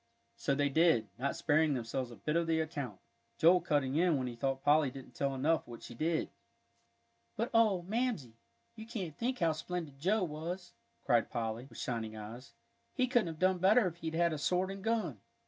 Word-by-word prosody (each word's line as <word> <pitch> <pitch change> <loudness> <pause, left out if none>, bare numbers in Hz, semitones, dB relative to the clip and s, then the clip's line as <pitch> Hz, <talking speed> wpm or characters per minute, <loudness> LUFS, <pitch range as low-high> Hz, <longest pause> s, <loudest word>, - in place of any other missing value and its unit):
So 135 - 0
they 145 0 +2
did, 155 -7 +3
not 140 +2 -1
sparing 155 -2 +2
themselves 120 +1 -3
a 120 - -10
bit 150 +5 -2
of 170 0 +2
the 160 -1 +2
account, 155 -5 -4 0.4
Joel 175 +2 +6
cutting 145 -4 +1
in 170 -3 +3
when 130 - -2
he 120 -1 -5
thought 135 +2 -2
Polly 150 -1 +4
didn't 130 -1 -11
tell 135 +3 -1
enough 155 +5 +1
what 120 -1 -10
she - - -8
did. 160 +6 -1 1.0
"But 235 +3 -2
oh, 215 -6 +4
Mamsie, 210 - -2 0.4
you 220 0 -9
can't 190 -10 -5
think 250 +2 -1
how 170 -5 +2
splendid 155 -3 -5
Joe 195 +7 +2
was!" 175 +3 -5 0.3
cried 120 -4 +3
Polly, 115 +2 -3
with - - -14
shining 115 -5 -3
eyes; 115 +3 -9 0.4
"he 255 - +3
couldn't 240 -6 +2
have 165 -1 -5
done 185 +2 +2
better 210 +5 +5
if 170 -2 -3
he'd 160 -1 -4
had 170 0 +2
a 155 - -3
sword 180 +5 +1
and 195 0 -8
gun." 215 - -1
160 Hz, 200 wpm, -33 LUFS, 135-180 Hz, 1.0 s, Joel